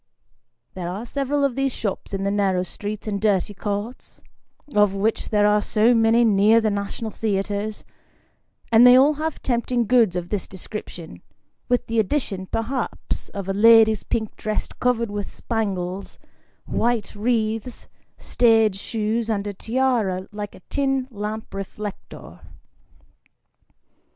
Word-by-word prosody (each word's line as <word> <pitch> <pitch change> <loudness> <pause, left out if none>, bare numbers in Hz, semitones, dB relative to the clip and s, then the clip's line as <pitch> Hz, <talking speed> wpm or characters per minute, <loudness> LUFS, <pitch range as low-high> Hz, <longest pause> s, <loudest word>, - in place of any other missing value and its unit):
There 175 -2 -5
are 200 +6 -5
several 280 +3 -1
of 275 -2 +2
these 270 +1 0
shops 205 -5 -4
in 195 -1 -3
the 200 - 0
narrow 195 -3 +1
streets 210 +3 -6
and 200 -2 -2
dirty 205 -2 +1
courts, 205 +4 -5 0.5
of 205 -2 +3
which 215 +3 -1
there 210 -1 +3
are 210 0 +4
so 220 +3 +3
many 230 +1 +4
near 215 +1 +5
the 220 -1 +1
national 200 +2 -4
theatres, 205 0 -2 0.9
and 230 +2 +8
they 250 - +9
all 275 +4 +6
have 320 0 -3
tempting 240 -1 0
goods 225 -5 +3
of 175 -1 -3
this 205 -3 -2
description, 175 - -8 0.5
with 245 0 +1
the 230 0 -1
addition, 200 -4 -1
perhaps, 235 +6 -3
of 200 -2 -6
a 195 - -1
lady's 220 +1 +6
pink 220 -2 -3
dress 215 0 -3
covered 235 -3 +1
with 205 -1 -4
spangles; 195 -4 -3 0.5
white 235 -3 -1
wreaths, 225 +1 -2 0.3
stage 225 -4 +3
shoes, 225 +1 -2
and 205 -2 -1
a 205 - -4
tiara 220 -5 0
like 210 -1 -6
a - - -15
tin 270 +3 -1
lamp 215 0 -5
reflector. 195 +1 -8
215 Hz, 140 wpm, -23 LUFS, 200-235 Hz, 0.9 s, they